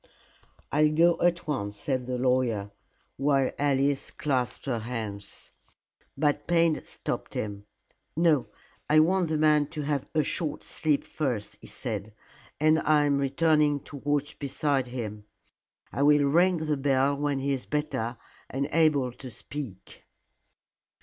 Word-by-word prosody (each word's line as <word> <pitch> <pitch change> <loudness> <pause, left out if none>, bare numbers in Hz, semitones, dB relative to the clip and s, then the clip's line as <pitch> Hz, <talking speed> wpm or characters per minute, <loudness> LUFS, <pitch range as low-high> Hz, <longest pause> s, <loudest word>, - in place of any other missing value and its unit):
"I'll 150 +1 +4
go 170 +2 +3
at 175 0 +2
once," 105 -9 -3
said 130 +1 -2
the 125 -1 -2
lawyer, 125 -5 +1 0.5
while 135 -1 +2
Alice 140 -1 +1
clasped 130 -4 -2
her 120 -4 -1
hands. 110 -4 -6 0.7
But 145 0 +1
Payne 165 -2 +3
stopped - - -5
him. 100 -1 -4 0.5
"No. 160 -5 +3 0.4
I 155 +1 +6
want 175 +2 +3
the 155 - +1
man 150 -1 +4
to 150 -1 -5
have 145 -2 -1
a 155 - +4
short 155 -2 -2
sleep 150 -3 0
first," 125 -9 -3
he - - -11
said, 105 +1 -5 0.4
"and 155 +1 +4
I 150 -1 +3
am 140 -1 +2
returning 150 +1 +2
to 145 - -10
watch 145 +1 -2
beside 140 -1 0
him. 105 -4 -6 0.7
I - - -3
will 145 0 +5
ring 175 +5 +4
the 155 -2 -1
bell 135 0 +2
when 145 0 -1
he 140 +1 0
is 130 - -4
better 140 -6 -2 0.3
and 140 +2 -2
able 150 -6 +3
to 130 +2 -10
speak." 120 -3 -8
140 Hz, 145 wpm, -27 LUFS, 125-150 Hz, 0.7 s, I